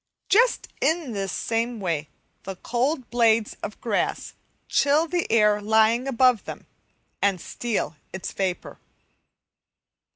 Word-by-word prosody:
Just 470 +5 +3
in 320 -5 +1
this 195 -3 -3
same 230 +2 -2
way 165 -6 -2 0.3
the 195 - -6
cold 250 - -2
blades 230 -2 +2
of 210 - -6
grass 220 -4 -1 0.3
chill 295 +4 +3
the 350 +1 -2
air 210 -2 +4
lying 220 +4 +3
above 255 -3 +3
them, - - -8 0.6
and 200 -2 +2
steal 225 -3 -3 0.2
its 190 - -5
vapour. 185 -2 -3
230 Hz, 120 wpm, -24 LUFS, 200-255 Hz, 0.6 s, air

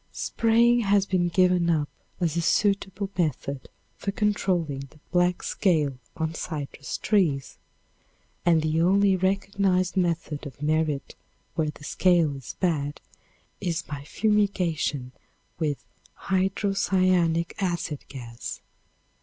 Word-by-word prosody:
Spraying 235 +1 +3
has 200 -3 +3
been 185 -2 +1
given 180 -1 +3
up 155 -3 +2 0.3
as 170 -3 0
a 170 - +1
suitable 195 +1 +1
method 140 -5 -2 0.3
for 200 - -2
controlling 185 -8 0
the 155 - -20
black 180 0 +2
scale 155 -8 +1 0.2
on 160 0 -1
citrus 150 -4 -5
trees, 145 - +1 0.8
and 165 -2 +4
the 155 +1 +1
only 195 +2 +4
recognized 190 0 +1
method 165 -5 -1
of 135 -3 -12
merit 150 -1 0 0.4
where 155 -2 0
the 150 - -10
scale 165 -1 +3
is 135 -4 -8
bad 150 -5 0 0.6
is 170 -3 -2
by 140 -2 -7
fumigation 180 - 0 0.5
with 150 -4 -2 0.4
hydrocyanic 185 -3 +1
acid 175 -5 -2
gas. 120 -4 -7
175 Hz, 110 wpm, -26 LUFS, 150-195 Hz, 0.8 s, and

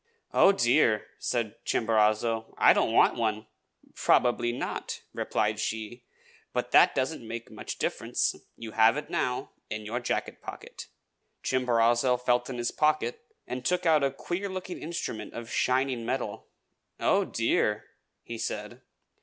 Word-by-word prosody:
"Oh, 195 - +7
dear!" 120 - +3
said 115 -4 -2
Chimborazo, 110 0 +1
"I - - +7
don't - - +1
want - - +4
one." 110 -2 -1 0.5
"Probably 120 -1 +2
not," 120 - -4
replied 105 0 -1
she, 110 +3 -4 0.5
"but - - -2
that - - +6
doesn't 130 -3 -2
make 115 +1 -6
much - - -6
difference. - - 0 0.2
You 115 -1 -7
have 115 +4 +4
it 150 - -6
now, 125 0 -1 0.2
in 110 0 -5
your 115 +3 -2
jacket 120 - -3
pocket." - - -9 0.6
Chimborazo 125 0 +2
felt 125 0 +1
in 125 - -5
his 120 0 -1
pocket, 150 -6 0 0.2
and 125 0 -5
took 180 +4 0
out 155 -3 +4
a 140 - +3
queer 180 +8 -4
looking 185 -1 -5
instrument 150 -10 -5
of 115 0 -7
shining 130 -2 +1
metal. 120 -3 -3 0.5
"Oh, - - +3
dear!" - - 0 0.4
he 115 -1 -7
said. 105 +5 -4
120 Hz, 140 wpm, -28 LUFS, 115-130 Hz, 0.6 s, Oh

